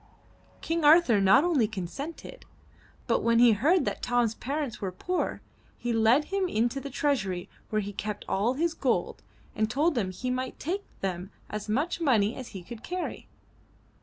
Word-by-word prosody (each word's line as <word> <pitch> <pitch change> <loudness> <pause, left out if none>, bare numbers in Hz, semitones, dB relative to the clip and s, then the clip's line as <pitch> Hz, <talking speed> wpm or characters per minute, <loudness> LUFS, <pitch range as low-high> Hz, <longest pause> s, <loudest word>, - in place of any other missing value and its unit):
King 330 0 -1
Arthur 295 - +6
not 195 +8 +6
only 305 -11 +2
consented, 250 - -7 0.6
but - - +2
when 230 0 +3
he 240 0 +7
heard 305 - +3
that - - -3
Tom's 245 -2 +1
parents 275 0 -4
were 190 -2 -2
poor, 360 - -2 0.4
he 240 -1 -2
led 230 +6 +4
him 390 -1 +1
into 240 -1 0
the 280 - -6
treasury 235 -11 -1 0.2
where 215 -1 0
he 205 +1 -6
kept 210 +1 -5
all 220 +7 +1
his 330 +3 0
gold - - -1 0.3
and 215 0 +1
told 300 +6 +1
him 205 -6 0
he 250 +7 -4
might 255 0 -3
take 380 +6 -3 0.2
them 185 -1 -3 0.2
as 210 0 -5
much 300 +10 0
money 230 -8 +3
as 255 - -7
he 190 -3 -9
could 225 +5 -9
carry. 365 0 -4
245 Hz, 170 wpm, -28 LUFS, 210-300 Hz, 0.6 s, he